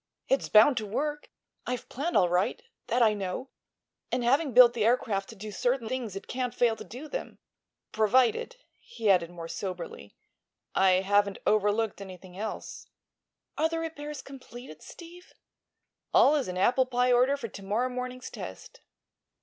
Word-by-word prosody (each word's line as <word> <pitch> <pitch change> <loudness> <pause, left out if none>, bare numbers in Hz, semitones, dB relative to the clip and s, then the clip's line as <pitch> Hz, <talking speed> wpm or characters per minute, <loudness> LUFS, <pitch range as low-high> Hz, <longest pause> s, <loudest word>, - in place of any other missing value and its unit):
"It's 270 - +1
bound 230 +5 +6
to 220 - -1
work. 295 +8 -3 0.4
I've 250 -1 -3
planned 310 +7 -1
all 180 - +5
right; 180 - 0 0.2
that 245 0 +2
I 215 -2 +4
know; 200 +6 -5 0.6
and 250 0 0
having 275 +4 +2
built 245 0 +8
the 230 -3 -1
aircraft 215 -4 +1
to 225 - -10
do 210 +1 -8
certain 245 +3 -1
things 235 -5 -4
it 195 - -7
can't 250 -1 -3
fail 235 -3 +3
to - - -8
do 260 +7 -9
them. - - -6 0.5
Provided," 230 - +2 0.2
he 225 - 0
added, 175 -3 +2
more 170 -1 -8
soberly, 180 0 -6 0.6
"I 185 -1 +4
haven't 200 0 +2
overlooked 210 0 +1
something 185 -2 -11
else." 215 +3 -6 0.7
"Are 320 +1 +3
the 330 - -3
repairs 300 -3 -5
completed, 245 - -11
Steve?" 350 +1 -13 0.8
"All 285 - +7
is 285 -4 0
in 180 0 -4
apple 250 +7 +3
pie 250 0 +2
order 255 +3 +4
for 230 -5 -6
to 200 - -10
morrow 215 +6 0
morning's 250 0 -6
test." - - -9
240 Hz, 160 wpm, -28 LUFS, 200-260 Hz, 0.8 s, built